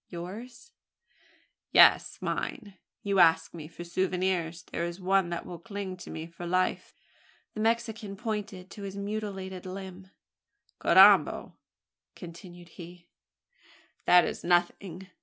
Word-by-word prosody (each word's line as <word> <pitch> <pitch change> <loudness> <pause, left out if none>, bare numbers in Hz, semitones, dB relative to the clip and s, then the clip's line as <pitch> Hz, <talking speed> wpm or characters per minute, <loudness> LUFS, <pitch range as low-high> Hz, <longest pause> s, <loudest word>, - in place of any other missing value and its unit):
"Yours?" 220 - -9 1.0
"Yes - - +6
mine. 205 -7 -4 0.2
You 200 -1 +1
ask 165 -1 +4
me 160 -3 -8
for 170 +1 -10
souvenirs. 180 -2 -1
There 170 - -5
is 170 +1 -4
one 190 -1 +2
that 170 -1 -4
will 175 -2 -8
cling 200 0 -6
to - - -11
me 160 0 -6
for 170 +1 -9
life!" 185 +1 -1 0.6
The - - -7
Mexican 225 -2 -1
pointed 205 -4 -5
to 205 - -10
his 195 0 -6
mutilated 200 -3 -5
limb. 190 0 -8 0.7
"Carrambo!" - - +5 0.6
continued 175 0 -11
he, 175 0 -13 1.0
"that 180 -1 +6
is - - -5
nothing. 175 +1 0
185 Hz, 120 wpm, -28 LUFS, 175-200 Hz, 1.0 s, Yes